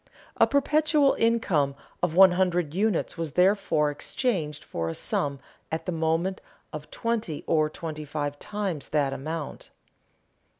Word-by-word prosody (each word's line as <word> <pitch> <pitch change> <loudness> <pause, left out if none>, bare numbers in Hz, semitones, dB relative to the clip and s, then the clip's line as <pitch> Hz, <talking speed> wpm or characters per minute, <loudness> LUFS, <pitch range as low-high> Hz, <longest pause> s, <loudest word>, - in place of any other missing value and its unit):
A - - +5
perpetual 295 0 +3
income 190 -12 +2 0.3
of 175 -2 0
one 190 0 +8
hundred 180 -4 +1
units 195 -3 0
was 160 -3 -3
therefore 180 -5 +3
exchanged 155 - -2
for 80 - -3
a 80 - -4
sum 140 -2 -1 0.3
at 160 - -3
the 180 - -2
moment 165 +3 0 0.3
of 150 0 -7
twenty 230 -9 -2
or 155 -2 +2
twenty 155 -1 -6
five 145 -1 -4
times 200 -8 -3
that 145 -3 +1
amount. 155 +2 -5
165 Hz, 135 wpm, -26 LUFS, 150-195 Hz, 0.3 s, one